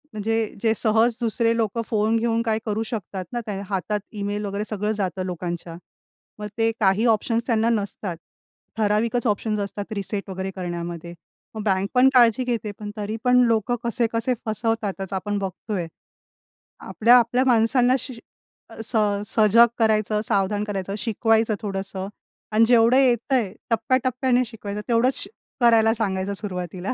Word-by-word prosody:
म्हणजे 215 +1 -1 0.3
जे 225 -1 +3
सहज 225 +1 +3
दुसरे 230 0 +1
लोकं 225 0 -1
फोन 215 0 +1
घेऊन 230 0 +1
काय 220 -2 0
करू 215 0 -1
शकतात 205 -5 -5
ना? 240 - -1
त्या 200 -2 -4
हातात 205 +2 -1
ईमेल 205 0 -3
वगैरे 200 +1 -3
सगळं 210 0 -1
जातं 190 -3 -2
लोकांच्या. 175 -1 -5 0.6
मग 210 - -4
ते 225 0 +2
काही 200 +2 +3
ऑप्शन्स 230 +1 +1
त्यांना 230 -2 +2
नसतात. 200 -5 -2 0.6
ठराविकच 220 +3 +1
ऑप्शन्स 210 0 0
असतात 200 +1 -5
रिसेट 200 0 -4
वगैरे 190 0 -4
करण्यामध्ये. 175 -2 -5 0.4
मग 215 - -4
बँक 195 -1 +1
पण 255 +1 +6
काळजी 240 -1 +5
घेते 235 -4 -2
पण 210 -1 -6
तरी 210 +1 -3
पण 250 0 +4
लोकं 230 +1 +1
कसे-कसे 235 +1 0
फसवतातच 215 -3 -2
आपण 205 +2 -2
बघतोय. 190 -1 -4 0.9
आपल्या-आपल्या 240 +2 +4
माणसांना 245 +1 +3
श 260 - -7 0.6
अ, - - -11
स 225 - -2 0.3
सजग 220 +2 +5
करायचं, 215 -2 +2
सावधान 205 -1 0
करायचं, 195 -2 -4
शिकवायचं 225 0 +1
थोडंसं 195 -1 -4 0.4
आणि 220 +2 +5
जेवढं 235 0 +5
येतंय 245 -4 +2 0.2
टप्प्या-टप्प्याने 255 +2 +1
शिकवायचं, 210 -2 -6
तेवढंच 240 +3 +3
श - - -11 0.3
करायला 225 -2 +5
सांगायचं 195 -3 -2
सुरुवातीला. 180 0 -4
215 Hz, 145 wpm, -23 LUFS, 200-230 Hz, 0.9 s, पण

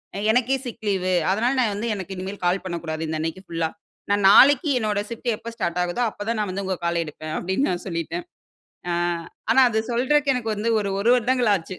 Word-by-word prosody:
அ, - - -4
எனக்கே 250 +3 +2
sick 230 -3 -8
leave 190 -2 0 0.2
அதனால 225 +6 +1
நான் 220 -5 +2
வந்து 220 +4 -3
எனக்கு 190 -1 -6
இனிமேல் 190 +2 -6
கால் 180 +2 +1
பண்ணக்கூடாது. 165 -3 -4
இந்த 160 0 -2
அன்னக்கி 165 +3 -4
ஃபுல்லா. 165 -1 -2 0.4
நான் 205 -1 +2
நாளைக்கு 285 - +7
என்னோட 210 -2 0
ஷிஃப்ட் 235 +1 -4
எப்போ 230 - -8
ஸ்டார்ட் 170 -4 -2
ஆகுதோ! 180 +7 -2
அப்ப 205 - -8
தான் 230 -1 0
நான் 210 -2 -1
வந்து 195 +2 -3
உங்க 190 0 -1
கால 170 0 0
எடுப்பேன். 155 0 -8
அப்பிடின்னு 190 +10 0
நான் 175 - -4
சொல்லிட்டேன் 170 - -4 0.7
ஆ, - - +1 0.6
ஆனா 265 - +6
அது 220 -2 -1
சொல்றதுக்கு 275 +4 +2
எனக்கு 230 -3 -2
வந்து 210 +2 -2
ஒரு, 205 -2 -1
ஒரு 230 +4 +3
வருடங்கள் 250 -1 +2
ஆச்சு 185 0 -4
205 Hz, 210 wpm, -23 LUFS, 175-235 Hz, 0.7 s, நாளைக்கு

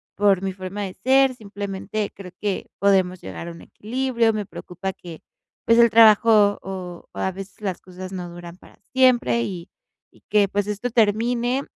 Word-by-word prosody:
por 195 -2 +3
mi 190 - -2
forma 190 +2 -6
de 190 -2 -6
ser, 265 0 +4
simplemente 205 -1 -5
creo 185 -3 -11
que 205 -2 -2
podemos 190 -2 +2
llegar 95 - -7
a - - -5
un 170 - -12
equilibrio. 235 0 -1
Me 210 -1 -3
preocupa 190 0 -6
que, 170 -3 -11 0.4
pues, 230 +1 +5
el 235 - +7
trabajo, 215 -2 +6
o 180 -2 -7
a 190 - -2
veces 195 +2 -10
las 190 -3 -3
cosas, 185 0 -9
no 180 -2 -6
duran 175 0 -10
para - - -19 0.2
siempre. 240 - +3
Y 175 +7 -5 0.4
y - - -24
que, 205 -1 +4
pues, 200 +1 -1
esto 210 +4 -3
termine, 240 +3 +1
200 Hz, 175 wpm, -23 LUFS, 185-225 Hz, 0.4 s, el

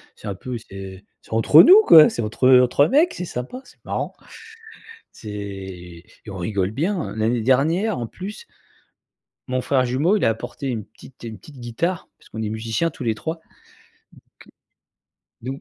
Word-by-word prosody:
C'est - - -11
un 100 - -4
peu 125 +4 -6
c'est 95 -3 -10 0.3
entre 115 +8 +6
nous 390 +5 +8
quoi, 155 -2 +9
c'est 120 - -4
entre, 110 +4 0
heu, 130 -1 +7
entre 135 +3 +3
mec, 310 +7 +3
c'est 180 - -5
sympa, 125 - -6
c'est - - -21
marrant. - - -3 1.0
C'est, 95 -5 -8 0.3
on 100 - -7
rigole 95 +1 -2
bien, 165 - -2
heu, - - -11
l'année 115 +1 0
dernière 160 - +1
en 120 - -4
plus 200 - -9 1.0
mon 130 0 -1
frère 130 0 +1
jumeau 150 +12 +1
il - - 0
a - - +4
apporté 120 +4 -5
une 110 -5 -4
petite 130 - -18
une 110 -2 -7
petite 145 -4 -15
guitare 165 +10 -3
parce - - -21
qu'on 110 - -6
est 105 - -3
musiciens 115 +9 -2
tous - - -9
les 115 -2 0
3, 160 +8 -5 2.0
donc 135 +3 -6
120 Hz, 170 wpm, -21 LUFS, 110-155 Hz, 2.0 s, quoi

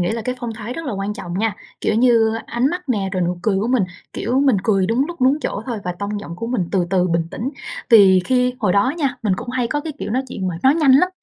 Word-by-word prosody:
nghĩ 175 - +1
là 230 0 -3
cái 250 +3 -2
phong 235 -2 -4
thái 225 +2 -6
rất 330 +5 -6
là 265 - -2
quan 195 +1 -3
trọng 175 +1 -5
nha, 220 -1 0 0.3
kiểu, - - 0
như 225 -1 +4
ánh 240 +2 0
mắt 355 -4 -5
nè 205 -6 0
rồi 185 -2 0
nụ 175 0 -1
cười 210 -3 +1
của 205 - -1
mình, 250 -4 +2 0.3
kiểu, 250 +4 0
mình 270 -6 +4
cười 195 -4 +2
đúng 235 +7 +1
lúc, 340 -3 -8
đúng 265 +3 +3
chỗ 205 - -3
thôi 235 -4 -3
và 180 - -2
tông 205 +1 -3
giọng 170 -4 -8
của 230 - -5
mình 230 -8 -1
từ 185 -3 +1
từ 185 -1 +2
bình 170 -1 0
tĩnh. 250 +4 -4 0.4
Vì 195 -5 +7
khi 250 +2 +1
hồi 205 -5 +2
đó 205 +8 +3
nha, 280 -5 0
mình 210 -4 +1
cũng 245 - -7
hay 250 -1 0
có 295 - -1
cái, 310 +1 -5
kiểu, - - -4
nói 255 +4 0
chuyện 190 -6 -3
mà 170 - -4
nói 265 +2 +5
nhanh 305 -5 +4
lắm, 325 +7 +5
225 Hz, 290 wpm, -20 LUFS, 195-255 Hz, 0.4 s, Vì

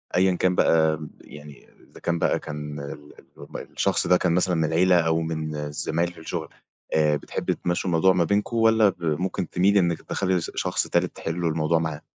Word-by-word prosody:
أيًا 90 0 +3
كان 90 0 +1
بقى 80 -2 +3
ب 75 -1 -9
يعني 75 -1 -13 0.2
إذا - - -14
كان 85 -1 -1
بقى - - +1
كان 75 -1 -6
ال 70 +2 -6 0.3
اللي - - -21 0.2
هُم - - -8
الشخص - - -1
ده 90 +1 +5
كان 90 -2 +1
مثلًا 90 0 +1
من 80 - +1
العيلة 85 +3 +3
أو 80 0 +1
من 80 -1 -3
الزمايل 75 +3 -2
في - - -15
الشغل 80 - -5 0.4
آآ، 75 -1 +3
بتحبي - - -3
تمشّوا 90 +1 -2
الموضوع 90 +2 +4
ما 90 -2 +2
بينكم 105 +7 0
والّا 110 -2 +5
ب 90 -2 -8
ممكن 85 +3 -2
تميلي 100 +3 +3
إنِك 85 -3 0
تدخّلي 95 -2 -1
س - - -5
شخص - - -1
تالت - - 0
تحلّوا 85 0 -2
الموضوع 80 +1 +1
معاه؟ 80 -2 -3
85 Hz, 200 wpm, -24 LUFS, 80-90 Hz, 0.4 s, ده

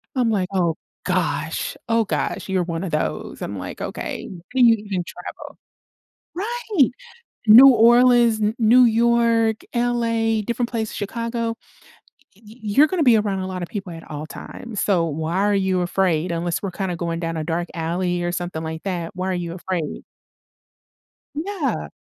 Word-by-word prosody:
I'm 245 -3 +2
like, 185 -3 0
"Oh 170 -4 +1 0.3
gosh, - - -1
oh 230 -1 +3
gosh, 195 - -3
you're 185 -2 +1
one 165 +1 -4
of 185 - -3
those." 115 - -3
I'm - - -5
like, - - -7
"Okay, - - -5 0.2
can 255 -2 +4
you 230 - +7
even 200 -4 -4
travel?" 180 - -8 1.0
Right! 420 - +1 0.6
New 245 +6 +10
Orleans, 240 -1 +5
N 210 +2 +1
New 240 +3 +6
York, 230 -1 +3 0.2
LA, 230 -2 +1
different 235 0 -1
places 220 -2 -3
Chicago. 230 +2 -3 0.8
Y 210 - -24
y 215 - -13
you're 215 +9 +4
gonna 345 0 -1
be 240 -5 +6
around 205 -2 0
a 185 - -3
lotta 185 -1 -4
people 195 -3 -6
at 165 0 -10
all 150 +1 -5
times, 220 +5 -7
so 180 -5 +2
why 160 +3 -3
are 205 +1 +2
you 190 -2 +1
afraid? 175 -2 0
Unless 170 +2 -2
we're 195 - -2
kinda 185 -2 -3
going 170 0 -3
down 165 -1 -3
a 155 - -3
dark 170 +2 -2
alley 175 +2 -1
or 175 0 -1
something 175 -2 -4
like 160 0 -5
that, 175 -4 -3
why 185 +1 -2
are - - 0
you 170 -1 -4
afraid? 175 -4 -4 1.3
Yeah. 335 -2 -2
205 Hz, 165 wpm, -22 LUFS, 175-235 Hz, 1.3 s, New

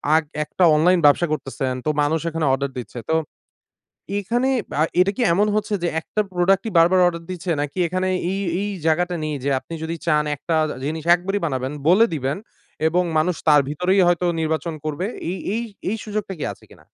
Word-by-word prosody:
আক 160 - +3 0.2
একটা 180 - -1
অনলাইন 175 +4 +4
ব্যবসা 145 +4 +5
করতেছেন। 135 -3 -3
তো 155 - +1
মানুষ 155 +3 +1
এখানে 160 -1 -2
অর্ডার 140 0 -1
দিচ্ছে। 120 0 -7
তো 160 - +3 1.0
এখানে 240 +6 0 0.3
আ - - +6 0.2
এটা 185 +2 +4
কি - - -1
এমন 205 +4 +3
হচ্ছে 215 0 -1
যে 175 - +2
একটা 215 - -1
প্রোডাক্টই 195 +4 +2
বার, 165 0 +7
বার 185 - +4
অর্ডার 170 -1 -3
দিচ্ছে? 175 -1 -4
নাকি 145 +4 -5
এখানে 185 +2 -1 0.2
এই, 195 - -2 0.2
এই 205 - -2 0.2
জায়গাটা 175 +2 +1
নেই 155 - -2
যে 140 - 0
আপনি 165 - -11
যদি 165 +1 -3
চান 150 -2 +3
একটা 165 +3 -2 0.2
আ - - -10
জিনিস 155 +1 -3
একবারেই 195 +3 -3
বানাবেন 130 -3 -2 0.2
বলে 200 +6 +6
দিবেন, 140 +3 -2 0.5
এবং 180 +3 +2
মানুষ 175 +3 +1
তার 150 -2 +7
ভিতরেই 180 +6 +2
হয়তো 175 0 +2
নির্বাচন 160 +1 -1
করবে? 155 +4 -2 0.3
এই, 190 - -4 0.2
এই, 230 - -1 0.3
এই 220 - -1
সুযোগটা 210 -2 -3
কি - - -2
আছে - - -20
কিনা? - - -18
170 Hz, 195 wpm, -22 LUFS, 155-185 Hz, 1.0 s, বার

